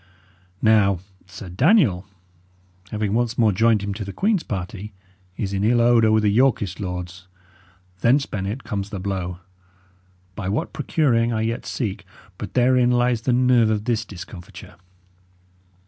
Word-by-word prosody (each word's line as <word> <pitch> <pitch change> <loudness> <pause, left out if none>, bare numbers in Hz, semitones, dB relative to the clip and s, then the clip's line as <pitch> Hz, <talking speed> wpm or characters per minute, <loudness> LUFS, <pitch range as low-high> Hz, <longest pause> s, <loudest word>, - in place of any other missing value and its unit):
Now, 105 -3 +4 0.3
Sir 90 +2 -10
Daniel, 105 - +3 0.8
having 105 -2 -2
once 120 0 0
more 110 -3 +4
joined 110 +1 +2
him 100 0 -3
to 105 +1 -5
the 100 - -6
Queen's 200 - +1
party, 100 - -6 0.4
is 100 -2 -3
in 100 0 -1
ill 120 +3 +3
odour 115 -2 +4
with 110 0 +3
the 105 - +3
Yorkist 110 -5 +1
lords. 90 -2 -6 0.7
Thence, 135 +7 +3
Bennet, 100 +6 -4
comes 105 -3 -4
the 100 - -5
blow 90 -2 -4 0.9
by 95 -1 -4
what 115 +12 -2
procuring, 120 -7 +1
I 110 -1 -1
yet 115 +1 -3
seek; 110 -7 -3 0.4
but - - -7
therein 125 0 +4
lies 120 -1 +2
the 125 - 0
nerve 125 -2 +4
of 105 -1 -1
this 115 -2 0
discomfiture." 90 -4 -11
110 Hz, 145 wpm, -22 LUFS, 100-120 Hz, 0.9 s, Now